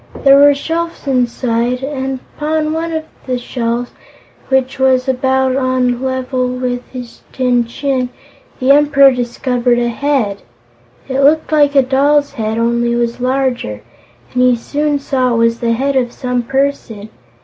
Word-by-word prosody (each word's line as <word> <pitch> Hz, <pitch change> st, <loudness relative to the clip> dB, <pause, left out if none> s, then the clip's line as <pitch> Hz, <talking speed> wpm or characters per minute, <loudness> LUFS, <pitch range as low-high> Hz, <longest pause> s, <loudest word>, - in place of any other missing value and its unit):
There 275 Hz, 0 st, +7 dB
were 285 Hz, 0 st, +6 dB
shelves 330 Hz, +4 st, -4 dB
inside, 245 Hz, -1 st, 0 dB
and 265 Hz, -2 st, -3 dB
upon 310 Hz, 0 st, -1 dB
one 330 Hz, +1 st, -3 dB
of 320 Hz, -1 st, -2 dB, 0.2 s
the 255 Hz, -1 st, -1 dB
shelves 240 Hz, 0 st, -3 dB, 0.6 s
which 265 Hz, 0 st, 0 dB
was 260 Hz, 0 st, +2 dB
about 265 Hz, 0 st, +1 dB
on 255 Hz, -2 st, +1 dB
a -, -, -6 dB
level 260 Hz, 0 st, -2 dB
with 250 Hz, 0 st, -3 dB
his 250 Hz, -2 st, -9 dB
tin 250 Hz, -2 st, +1 dB
chin 255 Hz, 0 st, -2 dB, 0.5 s
the 260 Hz, 0 st, +3 dB
Emperor 280 Hz, -1 st, +5 dB
discovered 245 Hz, 0 st, 0 dB
a 240 Hz, 0 st, 0 dB
Head 235 Hz, -6 st, -1 dB, 0.7 s
it 265 Hz, +1 st, -2 dB
looked 310 Hz, +3 st, +3 dB
like 290 Hz, -2 st, +3 dB
a 275 Hz, -, +6 dB
doll's 280 Hz, +2 st, +2 dB
head, 220 Hz, 0 st, -3 dB
only 235 Hz, +1 st, +1 dB
it -, -, 0 dB
was 235 Hz, 0 st, -1 dB
larger, 250 Hz, -, -1 dB, 0.5 s
and 250 Hz, -, +1 dB
he 250 Hz, -1 st, +4 dB
soon 290 Hz, +5 st, -1 dB
saw 260 Hz, -3 st, 0 dB
it -, -, 0 dB
was 230 Hz, 0 st, +2 dB
the 230 Hz, -1 st, 0 dB
Head 275 Hz, +4 st, -1 dB
of 245 Hz, -2 st, +1 dB
some 250 Hz, -1 st, -2 dB
person. 245 Hz, -5 st, -2 dB
255 Hz, 160 wpm, -15 LUFS, 240-275 Hz, 0.7 s, There